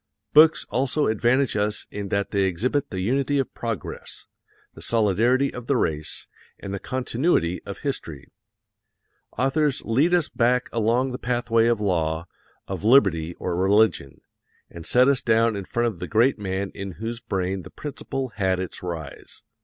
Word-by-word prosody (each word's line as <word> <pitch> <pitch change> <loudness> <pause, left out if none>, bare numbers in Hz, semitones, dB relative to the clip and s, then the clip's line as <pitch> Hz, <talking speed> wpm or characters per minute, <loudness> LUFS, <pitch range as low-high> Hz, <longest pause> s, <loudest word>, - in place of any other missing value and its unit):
Books 155 +1 +6
also 135 +4 +1
advantage 120 +4 +2
us 105 0 -1
in 100 -1 -5
that 100 +1 -1
they 100 -2 +2
exhibit 125 +11 -1
the 95 -2 -4
unity 135 +7 +1
of 135 - -1
progress, 115 -8 -6 0.5
the - - -13
solidarity 115 +5 +2
of 125 -1 -8
the 140 - +2
race, 75 -7 -2 0.3
and 100 - -7
the 100 - -3
continuity 125 - 0
of 100 - -6
history. 80 - -5 1.1
Authors 135 +3 +1
lead 145 +10 +3
us 170 -4 +1
back 125 +1 +1
along 120 +4 +1
the 125 - -5
pathway 120 -2 +1
of 120 -2 +2
law, 85 -5 0 0.4
of 95 -1 -5
liberty 95 -9 +4
or 90 - -3
religion, 95 -6 +2 0.5
and 85 -1 -7
set 125 +1 +5
us 140 -2 +3
down 115 -1 +2
in 100 -1 -5
front 120 +4 -1
of 110 -7 -2
the 90 - -5
great 115 +5 +3
man 95 -1 -3
in 100 -1 -6
whose 115 +5 -5
brain 95 -5 -2
the - - -11
principle 135 -2 -5
had 95 -4 0
its 95 - -5
rise. 85 -5 -7
110 Hz, 160 wpm, -24 LUFS, 95-130 Hz, 1.1 s, Books